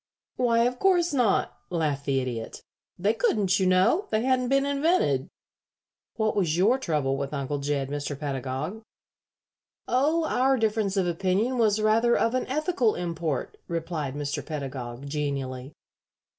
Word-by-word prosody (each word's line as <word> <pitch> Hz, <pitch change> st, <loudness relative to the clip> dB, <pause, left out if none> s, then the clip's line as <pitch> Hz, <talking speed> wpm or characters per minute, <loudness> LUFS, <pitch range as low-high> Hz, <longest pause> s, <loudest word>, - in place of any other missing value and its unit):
"Why, 235 Hz, -2 st, +3 dB
of 250 Hz, +1 st, 0 dB
course 350 Hz, -4 st, +3 dB
not," 245 Hz, -7 st, +1 dB
laughed 150 Hz, -5 st, -1 dB
the 135 Hz, -1 st, +2 dB
Idiot. 120 Hz, -3 st, -5 dB, 0.3 s
"They 200 Hz, +5 st, +2 dB
couldn't, 210 Hz, -4 st, +1 dB
you 190 Hz, -, +2 dB
know. 185 Hz, -, +3 dB
They 220 Hz, +1 st, +1 dB
hadn't 255 Hz, -1 st, +1 dB
been 275 Hz, +1 st, +3 dB
invented. 280 Hz, -, +1 dB, 0.9 s
What 220 Hz, -1 st, 0 dB
was 170 Hz, -5 st, +1 dB
your 220 Hz, +9 st, +3 dB
trouble 150 Hz, -, 0 dB
with 140 Hz, +1 st, -3 dB
Uncle 140 Hz, +1 st, -2 dB
Jed, 140 Hz, -1 st, -1 dB
Mr. 145 Hz, 0 st, -4 dB
Pedagog?" 140 Hz, -, -4 dB, 1.1 s
"Oh, 300 Hz, +6 st, +2 dB
our 265 Hz, -2 st, +2 dB
difference 215 Hz, -3 st, 0 dB
of 190 Hz, -, +2 dB
opinion 190 Hz, +8 st, 0 dB
was 215 Hz, -2 st, +3 dB
rather 225 Hz, +3 st, +3 dB
of 230 Hz, -, +1 dB
an 255 Hz, -, -1 dB
ethical 280 Hz, -, +1 dB
import," 165 Hz, -4 st, -3 dB
replied 165 Hz, -5 st, -3 dB
Mr. 145 Hz, 0 st, -3 dB
Pedagog, 135 Hz, -4 st, -6 dB
genially. 140 Hz, -3 st, -3 dB
185 Hz, 145 wpm, -26 LUFS, -, 1.1 s, Why